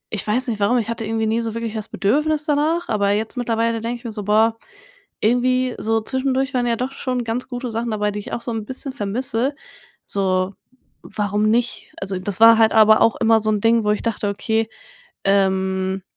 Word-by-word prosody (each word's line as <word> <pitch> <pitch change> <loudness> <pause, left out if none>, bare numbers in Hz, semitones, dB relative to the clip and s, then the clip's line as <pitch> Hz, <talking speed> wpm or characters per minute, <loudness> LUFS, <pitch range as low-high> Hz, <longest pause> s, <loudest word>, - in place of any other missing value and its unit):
ich 210 - -4
weiß 250 +6 +1
nicht 220 - -3
warum, 210 +5 +2
ich 230 -2 -1
hatte 230 -1 -3
irgendwie 220 0 -1
nie 225 +2 +1
so 225 -1 -4
wirklich 230 -1 -3
das 215 -2 -4
Bedürfnis 300 +8 +1
danach, 310 +3 +1
aber 205 -2 +1
jetzt 215 +4 -2
mittlerweile 230 -2 0
denke 235 +2 -3
ich 240 - -20
mir 230 - -5
so: 210 -1 -3
Boah, 220 +2 +2 0.6
irgendwie 250 +2 +2
so 225 0 0
zwischendurch 260 +3 -1
waren 245 -1 +1
ja 235 - +1
doch 255 +3 -3
schon 255 -2 -3
ganz 230 +2 -3
gute 245 -1 -5
Sachen 230 +1 -2
dabei, 210 -1 -1
die 205 - -5
ich 205 - -9
auch 235 - -3
so 235 - -4
'n 225 -1 -3
bisschen 260 +4 -6
vermisse, 245 +4 -1 0.5
so, 185 -1 0 0.5
warum 210 +1 -1
nicht? 235 +2 -1
Also, 195 -1 -3
das 190 +1 -4
war 225 0 +8
halt 220 -1 +4
aber 220 0 +6
auch 230 - +4
immer 225 -1 +3
so 215 - +1
'n 210 - +1
Ding, 230 +1 +3
wo 210 - 0
ich 210 - -1
dachte, 220 -3 -1
okay, 220 +2 -1 0.5
ähm 190 -1 +1
225 Hz, 210 wpm, -21 LUFS, 210-245 Hz, 0.6 s, war